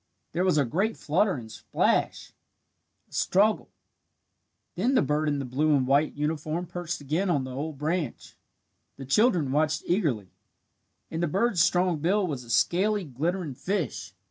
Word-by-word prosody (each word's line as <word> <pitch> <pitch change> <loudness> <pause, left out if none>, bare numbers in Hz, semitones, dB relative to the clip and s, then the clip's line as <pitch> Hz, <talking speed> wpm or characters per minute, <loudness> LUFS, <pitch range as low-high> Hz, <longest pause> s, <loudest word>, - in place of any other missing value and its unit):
There 175 +3 0
was 185 -4 +2
a 145 - +3
great 195 - -1
flutter 180 +5 +1
and 115 -4 -8
splash - - -1 0.7
a - - -37
struggle. 210 +3 +2 1.0
Then 240 +9 +1
the 255 - +5
bird 150 +1 0
in 145 - 0
the 140 - -3
blue 145 +5 +2
and 130 -2 +2
white 140 +3 +2
uniform 155 +3 -2
perched 175 -2 -5
again 160 +8 -1
on 145 -6 +1
the 130 0 -6
old 145 +2 -4
branch. 155 -1 -3 0.6
The 135 - -7
children 165 - +3
watched 155 +1 +1
eagerly. 145 - 0 0.8
In 160 - -3
the 170 - +1
bird's 190 +1 +2
strong 175 -1 +2
bill 190 +6 +2
was 140 -7 -4
a 120 - -15
scaly, 195 - +2
glittering 160 +4 -2
fish. 125 - -3
155 Hz, 160 wpm, -27 LUFS, 140-180 Hz, 1.0 s, the